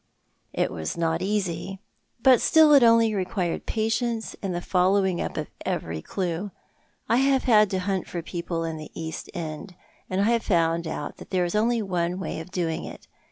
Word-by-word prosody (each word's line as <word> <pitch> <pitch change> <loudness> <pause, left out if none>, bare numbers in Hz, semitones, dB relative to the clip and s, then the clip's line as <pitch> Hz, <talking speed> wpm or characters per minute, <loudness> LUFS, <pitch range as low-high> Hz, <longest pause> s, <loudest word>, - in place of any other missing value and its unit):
" - - -45
It - - 0
was 80 - -4
not 165 0 0
easy— 195 -2 -2 0.4
but 260 -2 +6
still 315 -2 +6
it 280 - +8
only 230 -1 +5
required 185 -3 -2
patience 225 +1 -1
and 195 - -2
the 175 - -2
following 185 0 +2
up - - -4
of - - -4
every 80 -1 -3
clue. 180 - -3 0.6
I 230 - +3
have 270 0 +3
had 215 -4 +5
to 190 - -1
hunt 190 0 -2
for 170 -2 -5
people 170 -1 -4
in 165 -1 -3
the 155 - -8
East 160 -1 -6
End, 165 +2 -6 0.3
and 185 - -1
I 215 +3 +3
have 235 -1 +2
found 170 -4 +1
out 150 -2 -5
that - - -12
there 180 -2 +1
is 175 - -3
only 225 +2 +2
one 180 -1 -1
way 190 - -4
of 160 - -8
doing 170 -3 -2
it. - - -10
185 Hz, 195 wpm, -25 LUFS, 170-215 Hz, 0.6 s, it